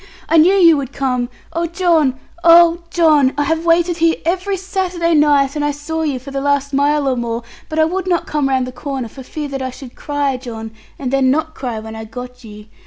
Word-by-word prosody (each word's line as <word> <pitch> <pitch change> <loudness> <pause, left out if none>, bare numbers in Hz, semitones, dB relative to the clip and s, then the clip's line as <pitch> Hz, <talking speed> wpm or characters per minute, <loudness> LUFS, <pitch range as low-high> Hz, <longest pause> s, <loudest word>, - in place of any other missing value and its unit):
'I 330 - +4
knew 335 +5 +6
you 335 -5 +6
would 275 -2 -4
come. 250 -3 -1 0.2
Oh 335 +1 -1
John! 325 -6 +1 0.2
Oh 340 0 +6
John! 305 -6 +3
I 290 - +2
have 325 +3 -1
waited 340 +1 +3
here 330 -1 +3
every 375 +3 -1
Saturday 365 -3 -1
night; 290 -2 +3
and 295 - -1
I 295 - +1
saw 295 +3 -4
you 295 -4 -1
for 265 +2 -10
the 275 0 -3
last 280 0 0
mile 285 +1 +2
or 260 - +1
more, 235 -1 -3 0.3
but 310 - -5
I 315 - +4
would 370 +3 -3
not 350 -2 +1
come 295 -3 -1
round 260 -1 +1
the 255 - -7
corner, 260 -2 -5
for 265 - -11
fear 295 +3 -6
that 270 -1 -4
I 260 - -2
should 255 -1 -11
cry, 285 -2 -2
John, 225 -3 -8 0.3
and 265 -1 -4
then 270 -1 +3
not 315 +3 0
cry 245 -6 -4
when 220 0 -9
I 220 0 -7
got 250 +2 -9
you. 210 -1 -11
290 Hz, 230 wpm, -17 LUFS, 260-330 Hz, 0.3 s, knew